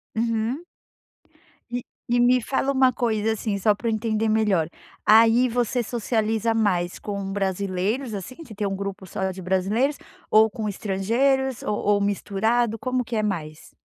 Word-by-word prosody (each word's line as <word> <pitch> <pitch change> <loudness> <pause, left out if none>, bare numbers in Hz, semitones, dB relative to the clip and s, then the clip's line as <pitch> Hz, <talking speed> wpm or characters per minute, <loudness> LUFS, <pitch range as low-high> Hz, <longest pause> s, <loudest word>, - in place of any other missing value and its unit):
Uhum. 230 +6 -1 1.1
E 245 0 -3 0.3
e 245 - +3
me 245 +1 +4
fala 270 +3 0
uma 260 -1 +4
coisa, 225 -2 0
assim, 215 -2 -2
só 210 +2 +3
pra 230 +3 -5
eu 225 - +1
entender 220 0 0
melhor, 210 -7 +2 0.4
aí 230 +3 +6
você 245 +1 0
socializa 225 -1 0
mais 185 -5 0
com 200 -2 -4
brasileiros, 200 +5 -1
assim, 200 +6 -6
você 225 - -11
tem 205 0 -2
grupo 200 -1 -5
só 190 +2 -2
de 185 0 -8
brasileiros, 200 - 0 0.3
ou 220 +1 +6
com 215 +1 -4
estrangeiros, 230 +7 0
ou 210 - -1 0.2
ou 200 - 0
misturado, 220 +3 0
como 255 +2 -1
que 235 - -4
é 215 - +1
mais? 155 -7 -4
220 Hz, 155 wpm, -24 LUFS, 200-240 Hz, 1.1 s, aí